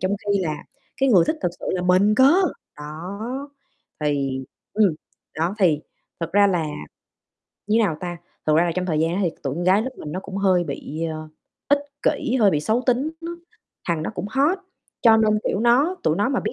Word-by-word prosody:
trong 185 +2 0
khi 200 0 +2
là 155 -5 -3 0.3
cái 270 - +2
người 185 -9 +6
thích 315 - 0
thật - - +1
sự - - -6
là 180 -1 -1
mình 185 +4 +4
cơ! 265 +6 +6 0.4
Đó, 200 - -6 0.5
thì 140 -3 -1 0.3
ừm, 205 -6 +3 0.4
đó, 170 +4 0
thì 165 -7 +3 0.4
thật 165 0 -4
ra 205 +1 +6
là, 175 -5 +1 1.0
như 215 +2 +3
nào 200 -9 +2
ta, 175 -1 -4 0.3
thật 155 - +4
ra 165 - +5
là 170 - 0
trong 185 0 -1
thời 155 -4 0
gian 165 +2 +1
đó 195 - -1
thì 175 - +1
t - - -24
tụi 135 -2 -2
con 175 +3 -3
gái 190 +4 +4
lớp 260 - -3
mình 150 - -7
nó 185 - -3
cũng 195 0 -8
hơi 185 -3 +3
bị, 155 +2 -5
ờ, 155 0 -7 0.4
ích 285 0 +4 0.2
kỉ, 255 - +1
hơi 205 -3 +6
bị 150 - +1
xấu 220 +10 +1
tính 255 +5 +2
nó, 340 0 -6 0.5
thằng 165 -2 0
đó - - -3
cũng - - -4
hot, 285 - +2 0.4
cho 225 -2 +7
nên, 215 -1 +3
kiểu, 195 - 0
nó 260 +10 +3
tụi 155 - +2
nó 205 +7 +1
mà 270 -2 0
biết - - -3
190 Hz, 220 wpm, -23 LUFS, 165-225 Hz, 1.0 s, cho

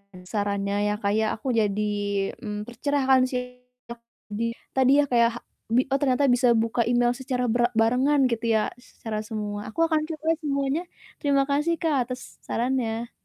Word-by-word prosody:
dan 180 - -12
sarannya 200 -1 -1 0.2
ya, - - 0
Kak, 200 0 +1
ya, 220 0 +2
aku 255 +3 -3
jadi, 210 -1 +1 0.6
mmm, 210 -1 -5
tercerahkan 265 +1 +2
sih 250 0 -5 0.3
ya, - - -5 0.4
di 225 +3 -2 0.3
tadi 265 +2 +5
ya - - +1
kayak 235 -1 +5
hak - - -34 0.3
bi 255 - +5
oh, 275 - +2
ternyata 280 0 +2
bisa 245 0 +4
buka 230 +1 +1
email 240 0 +3
secara 255 -1 -2
bra 240 +1 +2
barengan 260 +5 +3
gitu 230 0 -1
ya 215 - +1
s 255 - -21
secara 215 -2 -4
semua, 210 -1 -5
aku 275 - -9
akan 315 -2 +1
coba 315 0 -3
semuanya, 280 +1 -1 0.4
terima 280 -2 +3
kasih, 300 +4 +1
Kak, 275 -7 +1
atas 250 -1 -8
sarannya! 235 -1 -1
245 Hz, 175 wpm, -25 LUFS, 225-275 Hz, 0.6 s, tadi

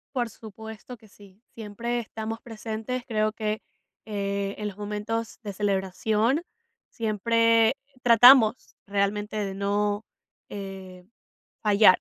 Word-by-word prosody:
Por 240 -2 0
supuesto 220 +3 -10
que 220 0 -19
sí, 200 +1 -18
siempre 230 +2 -3
estamos 225 0 -5
presentes. 225 +2 -5
Creo 215 -2 +1
que, 215 0 -3 0.4
eh, 200 -1 -2
en 210 - -3
los 200 - -7
momentos 210 +2 -4
de 205 -3 -6
celebración, 210 - 0 0.5
siempre 230 +2 +3 0.3
tratamos 240 0 +7
realmente 205 +1 -1
de 200 -2 -2
no, 205 +1 0 0.5
eh, 190 -2 -8 0.6
fallar, 205 -2 +6
215 Hz, 110 wpm, -26 LUFS, 200-225 Hz, 0.6 s, tratamos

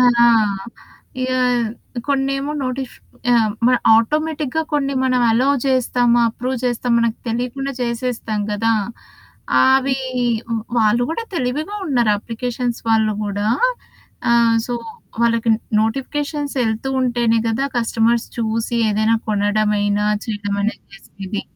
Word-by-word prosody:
ఆ! - - +6 1.2
ఇగ 255 - -1 0.8
కొన్నేమో 275 +1 0
నోటిఫ్ 255 0 -4 0.4
ఆహ్, 225 -3 +3 0.2
మన్ 250 0 +4 0.2
ఆటోమేటిక్‌గా 305 +5 0
కొన్ని 280 -1 0
మన 260 -1 +1 0.2
అలౌ 250 +4 +2 0.2
చేస్తామా, 245 -2 +2
అప్రూవ్ 255 +3 -3
చేసామా 245 0 0
మనకు 230 -1 0
తెలియకుండా 250 +4 -2
చేసేస్తాం 235 -3 -2
కదా! 225 +2 +1 0.9
ఆవి 265 0 +3 0.8
వాళ్ళు 220 +2 +3
కూడా 460 +8 -3
తెలివిగా 305 +8 -2
ఉన్నారు, 240 -7 +2
అప్లికేషన్స్ 240 +2 -3
వాళ్ళు 220 -1 +3
కూడా. 205 0 -2 0.9
ఆహ్, 235 -1 +4
సో, 245 - -2 0.5
వాళ్ళకి 230 0 +2 0.3
నోటిఫికేషన్సెళ్తూ 270 -1 -2
ఉంటేనే 240 -2 +2
కదా! 230 +5 0
కస్టమర్స్ 230 0 +1
చూసి 230 +1 -1
ఏదైనా 215 +2 +2
కొనడమైనా, 205 0 +1 0.2
చేయడమైనా 205 -1 -2 0.2
చేసేది. 195 0 -7
235 Hz, 105 wpm, -19 LUFS, 220-265 Hz, 1.2 s, ఆ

